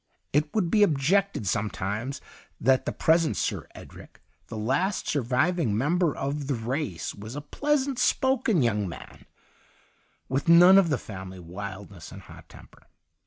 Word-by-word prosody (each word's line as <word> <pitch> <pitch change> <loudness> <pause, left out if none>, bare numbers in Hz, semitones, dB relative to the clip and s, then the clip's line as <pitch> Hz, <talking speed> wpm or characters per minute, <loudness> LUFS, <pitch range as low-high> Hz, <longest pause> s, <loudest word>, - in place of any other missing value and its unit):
It 150 +1 +1
would 180 -6 +1
be 210 -1 +5
ob 155 -8 +2
jectedj 190 - +1
sometimes, 105 +6 -3 0.4
that 130 +2 +2
the - - 0
present 160 0 +2
Sir - - -2
Edric, - - -13 0.3
the 110 - -7
last 140 - -1
surviving 130 - 0
member 165 +5 +1
of 140 +1 -3
the 140 - 0
race, 115 - -3
was 110 +5 -9
a - - -3
pleasant 275 - -1
spoken 255 - +2
young 105 -4 0
man, 85 - -11 1.0
with 135 +5 -1
none 175 +3 +8
of 180 -4 +2
the 145 - +1
family 95 -4 -9
wildness 95 0 -9
and - - -11
hot - - -15
temper. - - -17
140 Hz, 150 wpm, -26 LUFS, 105-175 Hz, 1.0 s, none